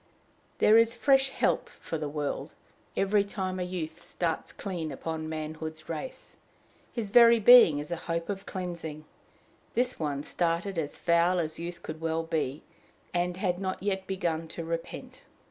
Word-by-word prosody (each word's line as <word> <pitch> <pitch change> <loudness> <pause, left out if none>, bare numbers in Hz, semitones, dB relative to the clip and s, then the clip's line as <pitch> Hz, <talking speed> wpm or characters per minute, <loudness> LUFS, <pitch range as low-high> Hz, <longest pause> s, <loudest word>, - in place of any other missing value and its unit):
There 220 +2 +6
is 230 +1 +3
fresh 270 +2 +4
help - - 0
for 165 - -6
the 150 -1 -3
world 145 -1 -3 0.4
every 200 +1 +3
time 190 -2 -3
a - - 0
youth 170 -2 -5
starts 165 -2 -2
clean 175 -6 -4
upon 160 +3 -4
manhood's 155 0 -6
race; 165 +10 -6 0.5
his 220 -5 -4
very 235 0 +8
being 220 -9 +8
is 150 +4 -5
a 170 - -1
hope 165 0 -1
of 200 -1 -5
cleansing: 170 -5 -5 0.7
this 250 +1 0
one 145 -3 -2
started 170 +3 -1
as 150 -2 -4
foul 170 +1 +3
as 160 -2 -2
youth 170 +1 -6
could 155 0 -7
well 165 0 0
be, 155 -4 -2 0.5
and 175 0 0
had 180 -2 0
not 190 -1 -3
yet 190 -2 -1
begun 165 -4 -1
to 165 +1 -6
repent. 165 0 -5
170 Hz, 160 wpm, -29 LUFS, 160-195 Hz, 0.7 s, very